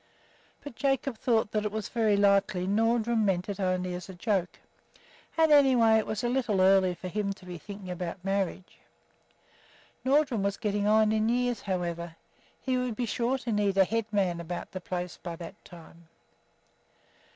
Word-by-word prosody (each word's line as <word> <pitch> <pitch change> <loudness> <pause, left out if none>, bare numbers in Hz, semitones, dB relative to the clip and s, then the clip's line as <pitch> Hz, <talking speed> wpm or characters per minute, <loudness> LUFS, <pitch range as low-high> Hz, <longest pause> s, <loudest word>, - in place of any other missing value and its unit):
But 290 - -8
Jacob 270 -2 -1
thought 225 -3 +1
that 210 0 0 0.2
very 220 -4 +2
likely 200 -2 +2
Nordrum 225 +2 +1
meant 185 -3 0
it 200 0 -4
only 185 -1 -1
as 180 +1 -7
a 190 - -8
joke; 185 -2 -1 0.8
and 320 -1 +4
anyway 250 -6 +6
it 215 - -3
was 215 - -3
a - - +1
little 240 -5 0
early 190 -1 +4
for 185 - -7
him 200 +1 -2
to 190 - -17
be 175 -2 -7
thinking 195 0 -8
about 180 +1 -5
marriage. 195 -1 -2 1.2
Nordrum 265 -4 +2
was 200 0 -1
getting 205 -2 -1
on 215 0 +4
in 220 +1 +1
years, 245 -2 0
however; 170 -3 -3 0.4
he 255 -1 -1
would 250 -3 -2
be 245 - -1
sure 240 +3 0
to 245 -2 -5
need 205 -2 +1
a 190 - +6
head 225 +3 -1
man 190 -5 0
about 175 +1 -6
the 185 - -6
place 180 -1 -5
by 170 -2 -5
that 165 0 -10
time. 170 -1 -15
205 Hz, 170 wpm, -28 LUFS, 185-230 Hz, 1.2 s, anyway